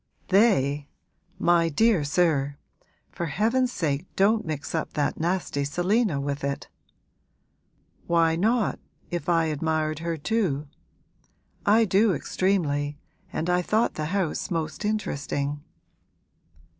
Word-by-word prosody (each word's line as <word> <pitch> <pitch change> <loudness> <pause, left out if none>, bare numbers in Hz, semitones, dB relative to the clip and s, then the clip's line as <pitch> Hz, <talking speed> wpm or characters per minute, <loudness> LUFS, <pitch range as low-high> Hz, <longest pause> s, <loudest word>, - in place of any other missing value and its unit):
'"They," 150 - +3 0.5
my 170 -1 +3
dear 210 +1 +3
sir! 145 -3 +1 0.5
For 170 - -4
heaven's 230 - +1
sake 155 - -2
don't 210 0 +3
mix 155 -2 -4
up 160 - -2
that 145 - -1
nasty 170 -4 -1
Selina 175 +3 +1
with 140 0 -3
it!' 140 0 -3 1.4
'Why 165 -1 +3
not, 220 +5 +1 0.3
if 175 +1 -3
I 165 -1 +3
admired 155 0 -1
her 165 0 -2
too? 150 -4 -1 1.0
I 220 +2 +5
do 200 0 +3
extremely, 145 -7 0 0.3
and 160 - -2
I 180 0 +2
thought 215 +6 +1
the 155 - -3
house 180 0 -1
most 165 +3 -3
interesting.' 145 -8 -2
165 Hz, 115 wpm, -26 LUFS, 145-195 Hz, 1.4 s, I